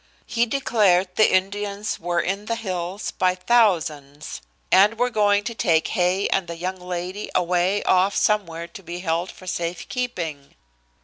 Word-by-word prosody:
He 235 +1 +1
declared 200 -8 +2
the 215 - +4
Indians 200 +2 -1
were 175 0 0
in 195 +3 -3
the 230 - 0
hills 185 -3 -4
by 185 0 +1
thousands, 165 -9 0 0.3
and 205 +4 +5
were 245 +1 +1
going 205 -2 +3
to 235 - -4
take 165 -7 +1
Hay 185 +2 +1
and 195 -2 0
the 170 - -6
young 185 +2 -3
lady 180 +3 -5
away 180 +3 +1
off 185 +2 +3
somewhere 170 -6 0
to 170 - -11
be 175 0 -7
held 170 +1 -1
for 185 - -13
safe 170 -1 -3
keeping. 170 - -4
185 Hz, 160 wpm, -23 LUFS, 175-205 Hz, 0.3 s, and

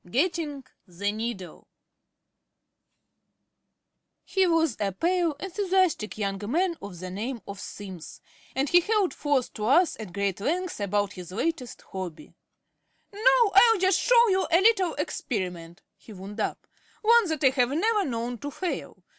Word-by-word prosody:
GETTING 295 - -1 0.2
THE 195 +3 -2
NEEDLE 215 -5 -6 2.6
He 385 -1 +2
was 325 -7 +2
a 200 -2 -1
pale, 345 - +1
enthusiastic 375 - 0
young 195 -2 -2
man 345 +5 +1
of 200 -3 -8
the 185 0 -6
name 230 +6 -4
of 200 -1 -7
Simms; 190 -6 -9 0.4
and 270 +2 +1
he 350 - +6
held 415 -1 +1
forth 285 -4 -1
to 215 - -4
us 335 +7 +4
at 210 -5 -7
great 200 0 -2
length 350 - -2
about 205 0 0
his 180 -2 -9
latest 255 - -3
hobby. 185 -4 -7 0.8
"Now 470 +1 +4
I'll 450 +3 +7
just 375 0 +3
show 480 -1 +5
you 380 -3 +1
a 335 - +6
little 385 -5 +3
experiment," 175 -6 -4
he 220 - -13
wound 200 +3 -9
up, - - -3 0.4
"one 460 -1 +5
that 315 -2 -2
I 265 - +6
have 250 -2 +2
never 415 +9 +1
known 240 -3 -3
to 285 - -5
fail. 355 +5 -5
270 Hz, 145 wpm, -26 LUFS, -, 2.6 s, I'll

